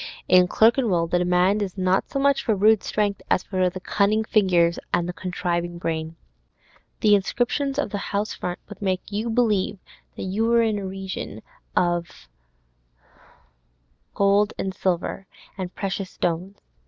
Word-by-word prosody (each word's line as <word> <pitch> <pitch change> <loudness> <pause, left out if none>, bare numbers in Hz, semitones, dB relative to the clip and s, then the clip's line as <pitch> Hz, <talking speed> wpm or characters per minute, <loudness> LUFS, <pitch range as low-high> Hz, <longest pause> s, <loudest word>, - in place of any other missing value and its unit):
In 180 0 +6
Clerkenwell 220 -4 +3
the 175 +1 0
demand 180 +3 +2
is 195 -1 -4
not 185 0 +1
so - - -3
much 280 0 +2
for 220 - +1
rude 215 +2 +4
strength 205 -2 -1
as - - +2
for 185 -2 0
the 185 +1 -7
cunning 205 +3 +1
fingers 180 -6 +2
and 175 - +1
the 180 - -4
contriving 175 -1 -3
brain. 160 -1 -3 0.9
The 210 -1 +5
inscriptions 245 +7 0
on 290 - 0
the 205 - -3
house 205 +1 -1
fronts 180 0 -5
would 205 -1 -11
make 190 0 -2
you 215 +3 -2
believe 220 -4 +1 0.4
that - - -6
you 195 +4 -1
were 235 0 +4
in 215 -2 0
a 195 - -5
region 190 0 -6 0.3
of 175 - -1 1.9
gold 200 +1 +3
and 190 - -3
silver 185 +1 -2 0.3
and 185 -2 -6
precious 195 -1 -3
stones. 180 +4 -3
195 Hz, 155 wpm, -24 LUFS, 180-210 Hz, 1.9 s, In